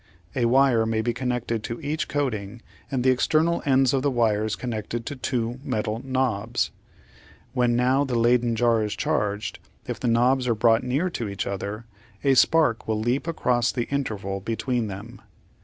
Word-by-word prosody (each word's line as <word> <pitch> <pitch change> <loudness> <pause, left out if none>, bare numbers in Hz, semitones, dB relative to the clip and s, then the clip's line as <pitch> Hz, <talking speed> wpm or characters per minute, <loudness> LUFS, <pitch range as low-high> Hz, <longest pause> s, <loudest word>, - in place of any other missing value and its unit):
A 125 -3 +1
wire 120 -2 +4
may 110 0 0
be 120 +1 0
connected 120 -2 -2
to 115 +1 -5
each 155 +2 -2
coating 115 -6 -3 0.3
and 130 -3 -1
the 130 - +5
external 160 +6 +2
ends 135 -1 +4
of 135 - +2
the 145 - +2
wires 110 -4 +1
connected 115 -1 -4
to 145 - -4
two 125 -2 -2
metal 110 -2 -2
knobs. 120 -4 -1 0.8
When 125 -2 +2
now 130 +3 +3
the 130 -3 -2
Leyden 120 0 +3
jar 115 -1 +3
is 105 - -3
charged, 105 +1 -1 0.3
if - - -5
the - - -2
knobs 125 +2 +3
are 115 - +2
brought 115 +1 +3
near 140 +9 0
to 115 -9 -3
each 100 - -3
other, 100 +3 -4 0.4
a 135 -1 +4
spark 135 -2 +3
will 110 -1 0
leap 120 +8 -1
across 125 -7 +1
the 120 -2 -2
interval 105 -8 -2
between 115 +3 -2
them. 105 +5 -8
120 Hz, 175 wpm, -25 LUFS, 110-130 Hz, 0.8 s, the